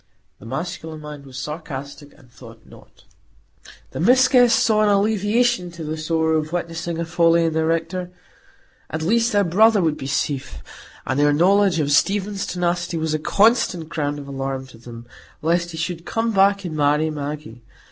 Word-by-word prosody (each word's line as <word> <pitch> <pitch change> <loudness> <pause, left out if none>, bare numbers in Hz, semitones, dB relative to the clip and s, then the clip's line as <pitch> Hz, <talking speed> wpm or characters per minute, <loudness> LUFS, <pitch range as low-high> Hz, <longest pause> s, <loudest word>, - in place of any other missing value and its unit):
The - - -12
masculine 160 +2 -5
mind 150 -2 -10
was 130 -1 -10
sarcastic, 145 0 -7
and 130 -5 -21
thought 115 -1 -15
not. - - -18 0.9
The - - -6
Miss 255 +9 +5
Guests 245 -2 +5
saw 215 -2 +2
an 210 - +3
alleviation 210 0 +1
to 170 -1 -8
the 155 +1 -4
sorrow 160 0 0
of 155 0 -3
witnessing 170 -1 -4
a 170 - -2
folly 165 0 +3
in 165 - 0
their 160 0 0
Rector; 165 +2 -2 0.8
at 160 +1 -4
least 230 +6 +2
their 205 -1 +3
brother 210 +5 +4
would 160 -4 0
be 135 - -6
safe; 140 0 -3 0.4
and 130 - -1
their 145 0 +4
knowledge 190 +2 +3
of 145 -2 0
Stephen's 200 +5 +1
tenacity 175 -1 -2
was 160 -1 -2
a 155 - 0
constant 185 -2 +2
ground 145 -3 -2
of 140 -1 -9
alarm 135 -1 -4
to 115 - -15
them, 115 0 -11 0.4
lest 170 +2 +1
he 165 - -8
should 170 +1 -4
come 225 +5 -1
back 200 -1 +3
and 160 -3 -5
marry 150 +1 +2
Maggie. 145 -5 -6
165 Hz, 180 wpm, -21 LUFS, 150-190 Hz, 0.9 s, Miss